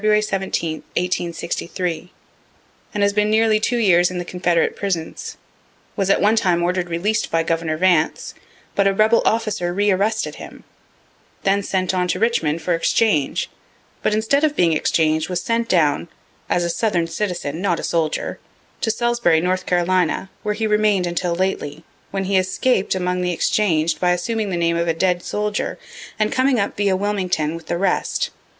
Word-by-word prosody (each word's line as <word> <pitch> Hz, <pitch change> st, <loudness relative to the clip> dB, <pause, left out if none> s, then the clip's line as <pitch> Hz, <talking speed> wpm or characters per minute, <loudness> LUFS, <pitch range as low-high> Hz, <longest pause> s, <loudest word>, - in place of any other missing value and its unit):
17, 200 Hz, -5 st, +1 dB
1863, 175 Hz, 0 st, -3 dB, 0.8 s
and 205 Hz, -, -1 dB
has 200 Hz, 0 st, +2 dB
been 210 Hz, 0 st, +2 dB
nearly 220 Hz, 0 st, +3 dB
two 240 Hz, +3 st, 0 dB
years 180 Hz, -6 st, +4 dB
in 180 Hz, -, -5 dB
the 175 Hz, -, -3 dB
Confederate 175 Hz, -2 st, 0 dB
prisons; 175 Hz, -5 st, -4 dB, 0.6 s
was 195 Hz, -1 st, 0 dB
at -, -, +4 dB
one 210 Hz, +2 st, +3 dB
time 180 Hz, -6 st, +2 dB
order'd 180 Hz, 0 st, -1 dB
releas'd 205 Hz, +6 st, -1 dB
by 165 Hz, 0 st, +1 dB
Governor 165 Hz, -1 st, -1 dB
Vance, 175 Hz, -3 st, +1 dB, 0.4 s
but 200 Hz, 0 st, +2 dB
a 195 Hz, -, +1 dB
rebel 220 Hz, +3 st, +4 dB
officer 215 Hz, -5 st, 0 dB
re 205 Hz, +3 st, +2 dB
arrested 215 Hz, +4 st, 0 dB
him; -, -, -11 dB, 0.8 s
then 200 Hz, +1 st, +2 dB
sent 190 Hz, -2 st, -1 dB
on 180 Hz, -1 st, 0 dB
to 180 Hz, -, 0 dB
Richmond 170 Hz, -8 st, 0 dB
for 180 Hz, -, +1 dB
exchange 165 Hz, -2 st, +1 dB, 0.5 s
but -, -, +1 dB
instead 230 Hz, +7 st, +1 dB
of 300 Hz, -1 st, +2 dB
being 170 Hz, -2 st, +3 dB
exchanged 155 Hz, +1 st, +1 dB
was 180 Hz, -1 st, -1 dB
sent 230 Hz, 0 st, -1 dB
down 160 Hz, -2 st, +2 dB, 0.4 s
(as 175 Hz, -, +1 dB
a 170 Hz, -, -1 dB
southern 175 Hz, -3 st, 0 dB
citizen, 165 Hz, -3 st, -3 dB
not 180 Hz, -4 st, +1 dB
a -, -, -6 dB
soldier,) 160 Hz, -2 st, -1 dB, 0.4 s
to -, -, 0 dB
Salisbury, 235 Hz, -7 st, +2 dB
N. 185 Hz, +1 st, +2 dB
C., 180 Hz, -1 st, +1 dB, 0.3 s
where 210 Hz, 0 st, -2 dB
he 220 Hz, +1 st, -1 dB
remain'd 210 Hz, -3 st, +2 dB
until 175 Hz, 0 st, -1 dB
lately, 170 Hz, -4 st, -2 dB, 0.3 s
when 195 Hz, -1 st, -2 dB
he 190 Hz, 0 st, +2 dB
escap'd 190 Hz, +3 st, 0 dB
among 180 Hz, 0 st, -1 dB
the 180 Hz, 0 st, 0 dB
exchang'd 165 Hz, -3 st, +1 dB
by 180 Hz, -1 st, +3 dB
assuming 215 Hz, +4 st, -2 dB
the 180 Hz, -, -2 dB
name 170 Hz, 0 st, +1 dB
of 170 Hz, 0 st, 0 dB
a 165 Hz, -, +1 dB
dead 180 Hz, +1 st, +1 dB
soldier, 210 Hz, +2 st, -2 dB, 0.4 s
and 215 Hz, -1 st, +1 dB
coming 260 Hz, -1 st, +2 dB
up 200 Hz, -, -1 dB
via 200 Hz, -2 st, +1 dB
Wilmington 185 Hz, -6 st, -1 dB
with 165 Hz, -1 st, -9 dB
the 170 Hz, -, -1 dB
rest. 195 Hz, +2 st, 0 dB
185 Hz, 170 wpm, -20 LUFS, 170-210 Hz, 0.8 s, years